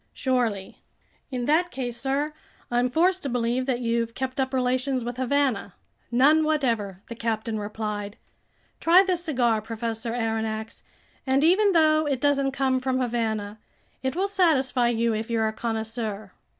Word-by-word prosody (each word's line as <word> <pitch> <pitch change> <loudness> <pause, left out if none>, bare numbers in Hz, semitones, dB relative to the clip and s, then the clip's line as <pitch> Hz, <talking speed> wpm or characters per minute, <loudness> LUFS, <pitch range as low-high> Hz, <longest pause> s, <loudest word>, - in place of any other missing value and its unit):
"Surely." 235 -7 -1 0.5
"In 250 -3 -3
that 330 +5 +3
case, 250 -6 -4
sir, 275 +5 -1 0.4
I'm 245 +1 +2
forced 365 +7 +2
to 280 - -3
believe 245 +1 -1
that 250 -2 0
you've 230 -1 -1
kept 260 0 -4
up 260 -1 0
relations 255 0 0
with 240 +1 -5
Havana." 260 -6 0 0.3
"None 280 +6 +4
whatever," 230 -11 -1
the - - -6
captain 225 -1 -2
replied. 210 0 -4 0.6
"Try 350 +3 +6
this 365 -3 -1
cigar, 240 -9 +1
Professor 225 +1 -4
Aronnax, 225 -1 -3 0.5
and 265 +2 +3
even 390 +5 +4
though 310 -2 +4
it 275 -3 0
doesn't 275 0 +2
come 265 -1 +1
from 255 0 -1
Havana, 220 -4 -2 0.4
it 260 0 -2
will 385 +3 +1
satisfy 275 -11 +2
you 230 -1 +1
if 220 +1 -3
you're 225 -1 +1
a 220 - -2
connoisseur." 220 -3 -4
245 Hz, 150 wpm, -25 LUFS, 225-275 Hz, 0.6 s, Try